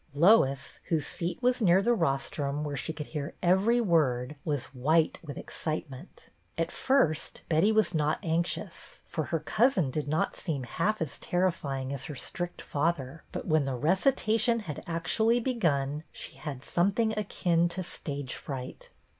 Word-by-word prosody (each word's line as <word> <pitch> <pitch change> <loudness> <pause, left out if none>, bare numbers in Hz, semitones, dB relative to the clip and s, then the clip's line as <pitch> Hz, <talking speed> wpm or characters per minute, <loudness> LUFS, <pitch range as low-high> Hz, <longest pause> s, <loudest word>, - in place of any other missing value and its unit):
Lois, 140 -6 +4
whose 160 -4 0
seat 170 +1 -2
was 250 0 +3
near 185 -3 +5
the 235 +5 +3
rostrum 145 -4 -1
where 145 -1 -3
she 140 +4 -2
could 150 -1 -6
hear 150 0 -5
every 190 +7 +4
word, 150 - +2
was 145 -4 -1
white 155 +5 +2
with 145 -3 -7
excitement. 155 -4 -6 0.3
At 165 0 0
first 260 - +1
Betty 165 +6 +4
was 220 -4 +2
not 155 -1 +1
anxious, 170 +2 -2
for 155 - -3
her 165 - -1
cousin 190 - +2
did 150 +1 -2
not 155 +2 0
seem 150 -7 -3
half 170 - 0
as 150 - -7
terrifying 140 -7 -1
as 135 -1 -6
her 150 - -6
strict 175 +6 -5
father; 150 -1 -1
but - - -5
when 155 -2 +2
the 135 -1 -2
recitation 220 - +2
had 160 -8 -6
actually 220 +8 +2
begun 155 - 0
she - - -7
had 140 -4 -6
something 200 +5 +1
akin 175 -5 +1
to 185 +2 -4
stage 145 -5 -5
fright. 130 -3 -7
160 Hz, 155 wpm, -29 LUFS, 145-190 Hz, 0.3 s, near